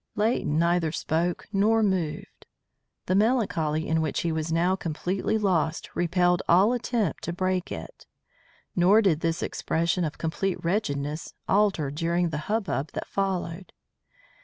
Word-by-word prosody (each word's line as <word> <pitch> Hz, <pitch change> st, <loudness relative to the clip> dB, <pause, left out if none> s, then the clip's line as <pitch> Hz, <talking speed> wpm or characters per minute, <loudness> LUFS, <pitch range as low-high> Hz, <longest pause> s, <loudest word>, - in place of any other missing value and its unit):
Leighton 210 Hz, -8 st, +1 dB
neither 170 Hz, -1 st, +2 dB
spoke 170 Hz, +2 st, -1 dB
nor 220 Hz, +3 st, +3 dB
moved. 180 Hz, -7 st, -2 dB, 0.6 s
The 185 Hz, -, 0 dB
melancholy 190 Hz, -8 st, +1 dB
in 160 Hz, 0 st, +1 dB
which 155 Hz, -3 st, -1 dB
he 170 Hz, -, -1 dB
was 160 Hz, 0 st, -2 dB
now 175 Hz, +3 st, +2 dB
completely 185 Hz, +5 st, -2 dB
lost 175 Hz, -6 st, 0 dB
repelled 175 Hz, 0 st, +2 dB
all 195 Hz, +7 st, +5 dB
attempt 235 Hz, -6 st, -1 dB
to 170 Hz, -, -2 dB
break 185 Hz, 0 st, -1 dB
it. -, -, -8 dB, 0.7 s
Nor 195 Hz, +5 st, +5 dB
did 170 Hz, -6 st, +3 dB
this 165 Hz, 0 st, -1 dB
expression 170 Hz, +2 st, 0 dB
of 155 Hz, -2 st, -3 dB
complete 180 Hz, +4 st, -1 dB
wretchedness 155 Hz, -5 st, -2 dB
alter 195 Hz, -8 st, +2 dB
during 170 Hz, +3 st, 0 dB
the 150 Hz, -2 st, -3 dB
hubbub 200 Hz, -9 st, -1 dB
that -, -, -4 dB
followed. 185 Hz, -2 st, -3 dB
175 Hz, 135 wpm, -26 LUFS, 160-195 Hz, 0.7 s, all